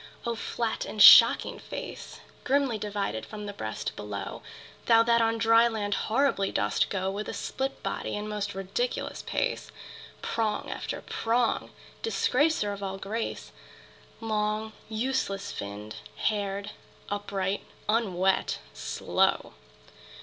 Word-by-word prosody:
O 235 - 0
flat 230 0 -2
and 215 - -7
shocking - - +9
face, - - -8 0.2
Grimly 270 -5 +1
divided 200 - -2
from 210 - -7
the 205 - -5
breast 110 - -4
below! 100 -1 -6 0.5
Thou 230 -1 +7
that 235 0 +4
on 225 0 +2
dry 225 +1 +5
land 210 -3 -2
horribly 225 -4 +1
dost - - +1
go 190 -1 -1
With 205 +2 -4
a - - -4
split 270 +1 -3
body - - -3
and 210 +1 -4
most 210 -2 -3
ridiculous 195 - -2
pace, - - -2 0.5
Prong 220 -2 -1
after - - -4
prong, 235 +1 0 0.3
disgracer 295 - +1
of 200 - -8
all 195 -1 -3
grace, 215 +4 -4 0.7
Long 215 0 -1 0.2
useless 220 -4 -1
finned, 105 +2 -7 0.2
haired, 200 -1 -1 0.4
upright, 200 -1 -2 0.2
unwet, 195 -4 +1 0.2
slow! 60 0 0
210 Hz, 120 wpm, -28 LUFS, 195-230 Hz, 0.7 s, shocking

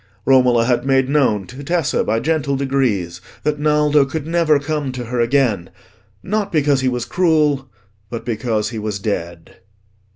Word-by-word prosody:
Romola 125 -3 +4
had 125 0 +1
made 135 -1 +2
known 125 -9 +2
to 130 +8 -10
Tessa, 165 -1 0
by 110 +1 0
gentle 150 -1 0
degrees, 120 -11 -1 0.2
that 150 0 -1
Naldo 150 -1 +3
could 145 +2 -4
never 165 -2 +2
come 145 -1 -3
to 125 -1 -5
her 120 +1 -3
again: 115 -6 +1 0.5
not 205 0 -2
because 145 -4 +2
he 130 - +1
was 125 -1 -3
cruel, 150 -3 +1 0.4
but 115 - -6
because 110 -2 -1
he 115 - -5
was 105 -1 -3
dead. 85 -5 -5
135 Hz, 160 wpm, -19 LUFS, 115-150 Hz, 0.5 s, Romola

